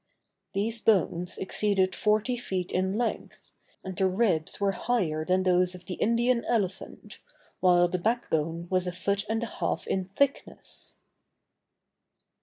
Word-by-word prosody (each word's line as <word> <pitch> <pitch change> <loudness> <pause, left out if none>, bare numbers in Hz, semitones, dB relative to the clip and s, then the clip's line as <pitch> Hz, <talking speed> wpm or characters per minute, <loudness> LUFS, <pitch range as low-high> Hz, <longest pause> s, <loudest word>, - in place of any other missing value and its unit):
These 220 +3 -1
bones 180 -4 +1
exceeded 190 -1 0
forty 215 +5 +1
feet 190 -7 -3
in 190 +2 0
length, 240 -1 -4 0.3
and 190 -1 -6
the 190 +2 +2
ribs 185 -5 0
were 200 -1 +2
higher 185 -8 -1
than 185 +3 +1
those 180 0 +2
of 180 -1 -13
the 180 - -5
Indian 235 +4 +1
elephant, 200 -5 -3 0.4
while 175 -1 +5
the 180 +1 -2
back 230 +6 0
bone 165 +2 -1
was 185 -1 +1
a - - -1
foot 200 +3 -1
and 225 +1 0
a 235 - -5
half - - -1
in 190 -1 -1
thickness. 270 +9 -3
190 Hz, 145 wpm, -28 LUFS, 180-220 Hz, 0.4 s, while